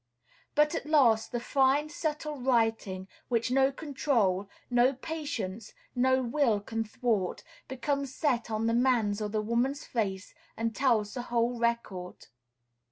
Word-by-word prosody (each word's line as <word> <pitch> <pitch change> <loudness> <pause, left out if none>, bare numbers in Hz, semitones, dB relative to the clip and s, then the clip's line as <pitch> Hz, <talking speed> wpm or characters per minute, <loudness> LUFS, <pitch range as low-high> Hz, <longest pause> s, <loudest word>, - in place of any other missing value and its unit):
But 300 0 +4
at - - -3
last 245 -8 +4
the 240 - -1
fine, 275 +4 +2
subtle 300 -1 -3
writing, 225 -7 +1 0.2
which 235 0 0
no 270 +1 +4
control, 240 -10 0 0.2
no 245 +2 +3
patience, 250 -9 -5 0.2
no 260 +1 +3
will 240 -3 +2
can 225 +2 -3
thwart, 215 -4 -1 0.2
becomes 275 +1 -2
set 250 -7 0
on 220 0 -1
the 230 - +2
man's 230 -4 +2
or 210 - -2
the 215 0 -1
woman's 245 +6 0
face, 200 -5 -3 0.2
and 225 -1 -2
tells 230 -6 +2
the 250 - -3
whole 240 0 0
record. 230 -6 -2
240 Hz, 140 wpm, -29 LUFS, 220-270 Hz, 0.2 s, But